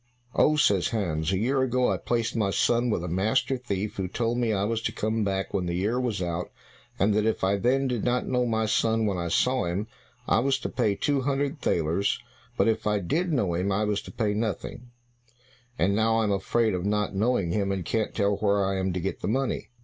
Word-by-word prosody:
"Oh," 155 - +4
says 100 - +3
Hans, 85 -7 -1
"a 95 - +1
year 130 +6 +1
ago 125 -1 +2
I - - 0
placed 115 -1 -1
my 105 -4 +1
son 120 +4 +2
with 95 -6 -1
a - - -3
master 110 +10 +1
thief 105 -5 -4
who 95 -2 -1
told 115 +5 -1
me 120 -2 +1
I 100 -2 0
was 110 +2 -1
to - - -1
come 110 +1 -1
back 95 -1 -2
when 90 -3 -1
the 85 - -2
year 105 +7 0
was 115 -7 -1
out, 85 0 -3 0.5
and 100 +2 +2
that 105 +1 +2
if 110 - -1
I 100 +1 +2
then 130 +6 +2
did 125 -4 -2
not 125 0 +1
know 125 -1 0
my 110 -1 +1
son 110 0 +1
when 100 -4 -1
I 85 - -2
saw 125 +8 +1
him, 90 +5 -2 0.4
I - - +3
was 135 +2 +2
to - - -3
pay 110 -5 0
two 140 +3 0
hundred 140 +2 -1
thalers; 85 +4 +1 0.4
but - - +3
if 110 -1 0
I 105 0 +2
did 165 - -1
know 105 - +1
him 90 +4 0
I 100 +2 +1
was 105 -1 0
to - - -11
pay 105 -3 -1
nothing, 115 +3 -4 0.9
and 100 +3 +2
now 115 +1 +2
I 115 - +2
am 105 - +1
afraid 110 +3 +1
of 90 -1 -2
not 105 +1 0
knowing 100 -3 +1
him 100 +1 0
and 95 -3 -3
can't 110 +3 -1
tell 100 -1 +1
where 100 -1 +2
I 95 0 -1
am 95 -1 -1
to 90 - -2
get 95 +2 -4
the - - -2
money." 130 +5 -1
105 Hz, 235 wpm, -26 LUFS, 95-120 Hz, 0.9 s, Oh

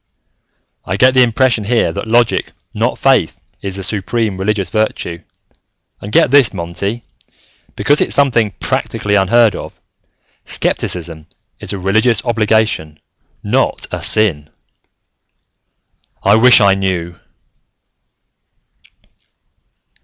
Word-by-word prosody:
"I 95 - -3
get 130 +2 +4
the 130 - +4
impression 120 -1 +2
here 110 -5 +1
that - - -5
logic, 120 0 +1 0.2
not - - -1
faith, - - +1 0.2
is 95 -1 -4
the 95 - -5
supreme 105 +1 -2
religious 100 0 -2
virtue. 110 -6 -2 0.8
And 100 - -8
get 125 - +3
this, 135 -8 +4
Monty, 100 +6 -4 0.7
because 145 +1 +2
it's - - +2
something 120 -6 +2
practically 105 - -2
unheard 105 +3 +3
of: - - -9 0.6
skepticism 80 -3 -3 0.3
is - - -3
a 100 - -3
religious 110 +5 +1
obligation, 110 -9 0 0.5
not - - 0
a - - -4
sin! 80 -9 +1 1.7
"I 100 - +4
wish 125 +3 +6
I 100 -1 +5
knew...." 90 -3 -3
105 Hz, 110 wpm, -15 LUFS, 95-115 Hz, 1.7 s, wish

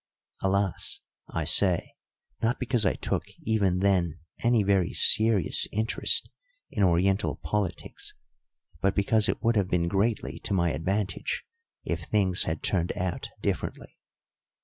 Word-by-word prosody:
Alas, 95 -1 -1 0.3
I - - -2
say, 90 -4 +2 0.5
not 120 +3 0
because 120 -5 +1
I - - +1
took, - - -2 0.2
even 100 -5 +1
then, 90 -5 +1 0.2
any 120 -2 +2
very 95 -3 +1
serious 110 -6 +5
interest 110 +2 +1 0.4
in - - -2
Oriental 95 +2 +2
politics, 100 -5 -3 0.7
but 95 0 +1
because 105 +2 +2
it - - -2
would 115 0 +2
have 100 -3 +2
been 85 -2 +1
greatly 100 +5 -1
to 100 - -2
my 85 -2 +2
advantage 95 +6 -2 0.4
if - - -3
things 95 -3 +2
had 80 -1 -3
turned 90 -2 0
out 90 -1 -3
differently. - - -4
95 Hz, 130 wpm, -27 LUFS, 90-105 Hz, 0.7 s, serious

